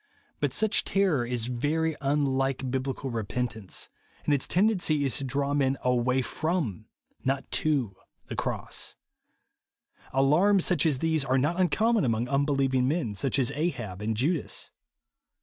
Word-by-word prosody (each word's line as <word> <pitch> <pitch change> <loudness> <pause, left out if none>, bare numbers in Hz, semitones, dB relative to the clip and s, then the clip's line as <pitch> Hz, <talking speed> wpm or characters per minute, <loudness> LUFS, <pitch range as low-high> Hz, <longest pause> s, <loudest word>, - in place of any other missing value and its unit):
But - - 0
such 220 -1 +2
terror 180 -11 +1
is 120 -2 -1
very 150 +7 0
unhke 135 -2 0
Bible 135 0 -2
repentance; 110 -2 -3 0.4
and 150 - +3
its 140 - +1
tend 205 +5 +3
ency 155 -8 +1
is 135 - +1
to 140 - -4
draw 140 +2 -1
men 135 -1 +2
aiuay 125 +1 +2
from, 155 - -2 0.4
not 135 +1 -1
to, 135 -10 0 0.3
the - - -30
the - - -4
cross. - - -3 1.2
Alarms, 170 +9 +4
such 170 -3 +2
as 145 -4 +2
these, 160 +1 +1
are 130 0 +1
not 150 +7 +1
uncommon 220 +4 +2
among 115 0 0
unbelieving 135 -2 +1
men, 145 -7 0
such 125 +7 0
as 130 -1 +2
Ahab 120 - -3
and 110 +1 -1
Judas. 150 +6 -1
135 Hz, 150 wpm, -28 LUFS, 125-155 Hz, 1.2 s, Alarms